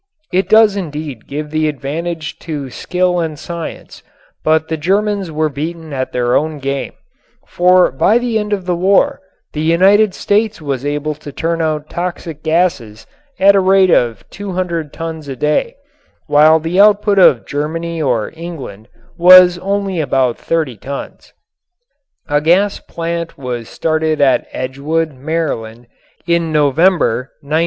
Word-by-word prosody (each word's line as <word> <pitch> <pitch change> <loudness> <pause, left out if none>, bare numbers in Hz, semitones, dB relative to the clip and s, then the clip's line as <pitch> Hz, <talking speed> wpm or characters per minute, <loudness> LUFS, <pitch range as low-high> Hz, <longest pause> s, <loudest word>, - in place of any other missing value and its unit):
It 185 0 +1
does 215 -1 +5
indeed 150 - -6
give 150 +1 -5
the 155 0 0
advantage 155 +3 -4
to 145 -5 -6
skill 180 +3 -1
and 160 -3 -3
science, 170 +2 -8 0.4
but 160 0 +2
the 160 - -2
Germans 195 +3 -1
were 155 0 0
beaten 155 +2 -6
at 130 -1 -3
their 120 0 0
own 155 0 0
game, 140 0 -4 0.5
for 180 -1 +3
by 195 - +3
the 240 -2 -1
end 210 0 -4
of 195 -3 -2
the 180 -1 0
war 190 +3 +2 0.3
the 150 - -3
United 190 +5 +3
States 210 +1 0
was 140 -4 -4
able 150 +1 -2
to 150 -1 -11
turn 165 +3 -2
out 155 -1 -2
toxic 170 -3 -5
gases 160 -10 -1 0.3
at 200 +1 +6
a - - +5
rate 190 -1 +4
of 115 -8 +1
200 180 -6 -4
tons 160 -2 -6
a 135 - -5
day, 150 - 0 0.5
while 155 +2 +5
the 165 +4 -2
output 205 -1 +4
of 120 - +5
Germany 165 +3 -3
or 120 -7 -1
England 140 - -8 0.3
was 180 0 +8
only 195 -1 -2
about 130 -4 +1
30 155 -8 -2
tons. 140 +7 -8 1.0
A 145 -1 +1
gas 190 +6 +2
plant 170 0 -5
was 125 -4 -5
started 155 -1 -1
at 135 -2 +2
Edgewood, 150 +5 -2
Maryland, 130 -5 -4 0.4
in 170 -1 0
November, 150 -3 +2 0.2
1917. 155 +3 0
160 Hz, 145 wpm, -16 LUFS, 145-180 Hz, 1.0 s, was